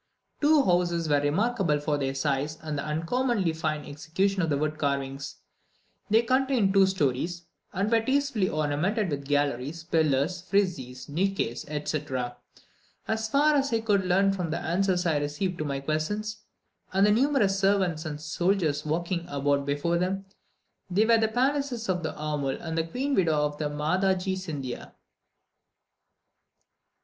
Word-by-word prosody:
Two 300 -1 +5
houses 175 -4 +1
were 145 -1 +3
remarkable 170 +1 +1
for 150 0 0
their 135 -1 -1
size 140 +2 -1
and 155 -1 -3
the 140 - -2
uncommonly 175 +5 0
fine 155 -2 -2
execution 185 +7 -1
of 165 - 0
the 145 - +1
wood 155 +1 -2
carvings. 140 -1 -2 0.7
They 220 +2 +4
contained 255 -5 +2
two 195 -1 +6
stories, 170 0 -1 0.3
and 195 +2 0
were 225 +2 +3
very 225 - -7
tastefully 275 -9 +1
ornamented 155 +7 0
with 140 -1 -4
galleries, 145 +2 -1
pillars, 160 +1 +1
friezes, 180 -10 -1
niches, 165 -6 -1
etc. 145 -4 -3 0.7
As 220 0 -1
far 295 +5 +4
as 275 -2 +1
I 225 -1 +1
could 205 -3 +2
learn 190 +2 +3
from 180 -4 -3
the 155 - -1
answers 180 +1 0
I 160 -3 +2
received 150 +5 -2
to 155 - -2
my 140 -1 -2
questions, 210 +9 -3 0.5
and 195 +1 +4
the 210 - +4
numerous 225 -5 +2
servants 190 -5 +2
and 150 -3 -5
soldiers 160 -1 0
walking 170 +2 -2
about 140 -1 0
before 155 +4 0
them, 190 +2 -1 0.6
they 200 +4 +3
were 230 0 +5
the 220 - +3
palaces 255 0 0
of 180 -1 +1
the 160 - -3
aumil 150 -3 -2
and 160 -1 -5
the 165 0 0
Queen 270 +11 -2
Widow 170 - +3
of 145 0 -4
Madhadji 180 +6 0
Sindhia. 150 -9 -6
170 Hz, 155 wpm, -27 LUFS, 150-200 Hz, 0.7 s, two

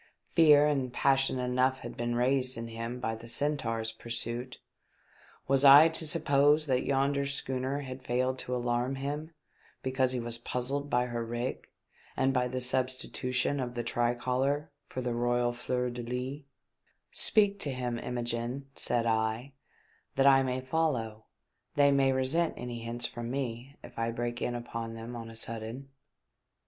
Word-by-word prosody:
Fear 150 -3 +7
and 135 -4 0
passion 135 0 +2
enough 130 +1 +1
had - - -7
been 120 0 -2
raised 130 +1 +1
in 115 0 -5
him 115 +2 -5
by 115 -3 -2
the 115 +1 -9
Centaur's 115 -5 -1
pur 110 +1 -13
suit; 120 +2 -3 0.9
was 135 0 +3
I 145 +3 +9
to 160 0 0
suppose 150 -1 +3
that 130 -3 +1
yonder 140 +1 +1
schooner 135 0 -2
had 130 -1 -7
failed 130 +1 -1
to 125 - -3
alarm 120 +2 0
him 145 +4 -5 0.5
because 130 -1 +1
he 125 - -1
was 115 0 -3
puzzled 135 +4 -3
by 125 -1 +2
her 120 -1 -3
rig 120 +2 -4 0.5
and 135 0 +2
by 125 -1 +1
the 130 +1 -3
substitution 130 +1 -1
of 125 -1 -4
the 120 - -2
tricolour 125 +5 0 0.2
for 130 - -5
the 125 -1 -2
xoysiX 120 0 +1
fleur 125 0 -1
de 120 0 -5
lys? 125 +4 -4 0.7
"Speak 205 -2 +4
to 145 - -1
him, 125 -2 -3
Imogene," 120 +2 -3
said 120 -2 -1
I, 110 +4 0 0.6
"that 135 - +3
I 135 -1 +7
may 130 -1 -1
follow. 130 -7 -1 0.5
They 140 -1 +5
may 135 -1 +3
resent 135 +6 +1
any 120 -1 -5
hints 120 +1 +2
from 120 -1 -5
me 130 0 -4
if - - -10
I 115 0 0
break 120 +1 -3
in 120 - -1
upon 115 -1 -5
them 115 +2 -7
on 115 -1 -7
a 115 - -11
sudden." 115 +4 -5
125 Hz, 160 wpm, -30 LUFS, 120-135 Hz, 0.9 s, I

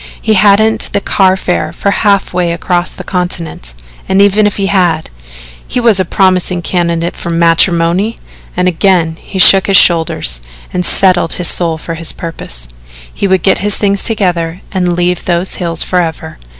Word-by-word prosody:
He 220 - 0
hadn't 210 +2 +3
the - - +1
car 190 -1 +1
fare 180 -1 -2
for 200 - -2
half 200 -2 0
way 175 -1 0
across 175 +1 -2
the - - -10
continent 170 - -4 0.3
and 190 +1 +2
even 205 +1 +3
if 205 - -3
he 200 - -1
had, 175 -5 0 0.6
he - - -2
was 230 -5 +3
a 185 - 0
promising 185 -1 0
candidate 170 -1 -2
for - - -7
matrimony! 170 +4 +1 0.4
and 180 0 +1
again 170 -2 +1
he 195 - -8
shook 190 +1 +6
his 195 -1 +4
shoulders 160 - +2 0.3
and 180 - -1
settled 180 -2 +2
his 180 - 0
soul 165 -2 0
for 165 +2 -7
his 165 0 -2
purpose. 105 - -4 0.5
He 200 - -2
would 190 -2 +1
get 190 - +2
his 205 0 +2
things 200 -1 0
together 180 -5 -1
and 180 -2 -1
leave 180 0 -1
those 175 +1 -2
hills 165 -2 -1
forever. 165 -3 -3
180 Hz, 170 wpm, -11 LUFS, 170-195 Hz, 0.6 s, shook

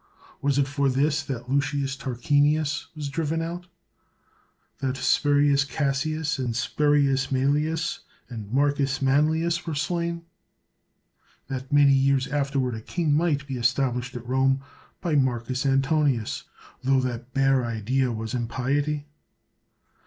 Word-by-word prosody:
Was 140 -1 +1
it 140 -1 +2
for 140 0 +1
this 145 +4 +1
that 125 -3 -5
Lucius 140 0 0
Tar 130 -2 -5
quinius 145 +2 +1
was 150 -2 -4
driven 160 +2 -1
out; 175 +2 -5 1.1
that 135 -1 -2
Spurius 145 +1 +3
Cassius, 145 +1 -1
and 120 -3 -2
Spurius 140 +1 +2
Mselius, 150 +7 0 0.3
and 110 -4 -8
Marcus 140 0 +1
Manlius 160 +5 +1
were 160 - -2
slain; 170 +2 -2 1.3
that 130 0 -5
many 145 -1 +6
years 135 0 +3
afterward 135 -3 -1
a 110 - -5
king 160 +5 -1
might 150 -3 +1
be 135 -2 -4
established 125 0 0
at 120 -1 -6
Rome 135 +1 +2 0.4
by 170 - -1
Marcus 130 -1 0
Antonius, 135 -3 +1 0.4
tho 135 +1 +3
the 125 -2 -2 0.2
bare 135 -1 +3
idea 120 +3 0
was 110 +1 -4
impiety? 135 +5 -1
140 Hz, 125 wpm, -25 LUFS, 130-150 Hz, 1.3 s, many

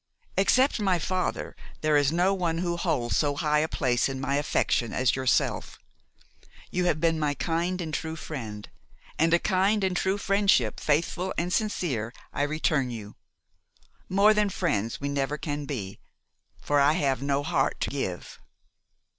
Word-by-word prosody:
Except 255 +7 +3
my 190 -4 +2
father, 185 +3 -2 0.3
there 155 -1 +2
is 145 -1 +3
no 180 +4 +2
one 175 -4 -1
who 175 0 -1
holds 150 -9 -1
so 145 -2 +1
high 150 0 +1
a 155 - +1
place 125 -5 +1
in 135 -1 -4
my 135 +1 0
affection 125 -5 0
as 130 -2 +2
yourself. 130 -1 0 0.9
You 180 0 0
have 155 -3 +1
been 165 0 +1
my 145 -1 0
kind 175 +4 -1
and 160 -3 -4
true 160 +1 -3
friend; 115 -10 -7 0.5
and 165 +1 +3
a 170 - +6
kind 195 +3 +1
and 190 -1 0
true 190 +2 +1
friendship, 195 - +2
faithful 170 +5 0
and 175 +2 -1
sincere, 145 - -1 0.2
I - - -2
return 145 -2 +1
you. 110 -3 -8 0.9
More 200 +3 +5
than 210 -1 +2
friends 115 - -1
we 140 - -3
never 140 +1 -1
can 145 -1 -4
be, 105 -10 -5 0.6
for 145 0 +1
I 140 +2 +5
have 140 -6 0
no 140 0 0
heart - - 0
to - - -1
give. - - -4
155 Hz, 165 wpm, -27 LUFS, 140-180 Hz, 0.9 s, a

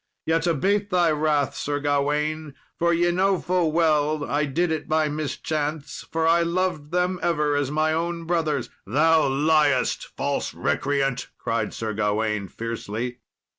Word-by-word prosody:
Yet 165 +1 +1
abate 200 +6 +1
thy 175 -4 +3
wrath, 150 -2 +1
Sir 145 0 -2
Gawain, 145 +1 -1 0.2
for 170 0 +3
ye 175 +1 +2
know 190 +1 +2
full 175 -3 +1
well 155 -2 +2
I 150 +1 +1
did 165 +5 0
it 155 -2 -3
by 155 -1 +2
mischance, 150 0 -3
for 160 0 +1
I 170 +1 +4
loved 170 -3 -1
them 180 +2 0
ever 150 -3 +1
as 145 -2 0
my 155 +1 +1
own 170 +1 -2
brothers." 160 -6 -1 0.2
"Thou 155 +7 +4
liest, 145 -1 +2
false - - -2
recreant," 135 -2 0
cried 115 -2 -2
Sir 110 -1 -3
Gawain, 105 -1 0
fiercely. 115 +3 -5
155 Hz, 145 wpm, -24 LUFS, 140-165 Hz, 0.2 s, I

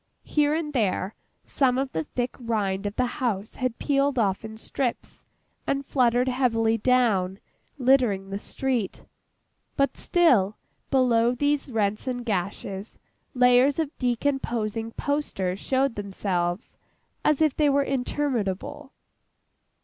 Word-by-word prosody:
Here 295 0 +2
and 310 -2 -3
there, 205 -4 0 0.3
some 255 -3 +1
of 265 0 -1
the 160 - -2
thick 245 0 -2
rind 205 -4 -1
of 205 - -5
the 255 - +2 0.2
house 220 -4 -2
had 255 -2 -2
peeled 280 -1 +1
off 200 -4 +1
in 220 0 -8
strips, 245 +2 -4 0.4
and 275 0 0
fluttered 250 -2 +2
heavily 230 -3 +2
down, 210 -7 +2 0.4
littering 245 -8 +2
the 200 - -3
street; 250 -4 -2 0.7
but, 275 0 +2
still, 245 - +3 0.3
below 245 -2 +3
these 285 +1 0
rents 215 -1 -1
and 245 -1 -3
gashes, 195 0 -3 0.4
layers 250 +2 +5
of 315 -3 -2
decomposing 235 -3 -1
posters 200 -11 -2
showed 265 +1 +1
themselves, 190 -2 -3 0.5
as 300 -2 +3
if 310 -3 +3
they 300 -2 +3
were 280 0 +3
interminable. 265 -1 -2
245 Hz, 125 wpm, -26 LUFS, 205-275 Hz, 0.7 s, layers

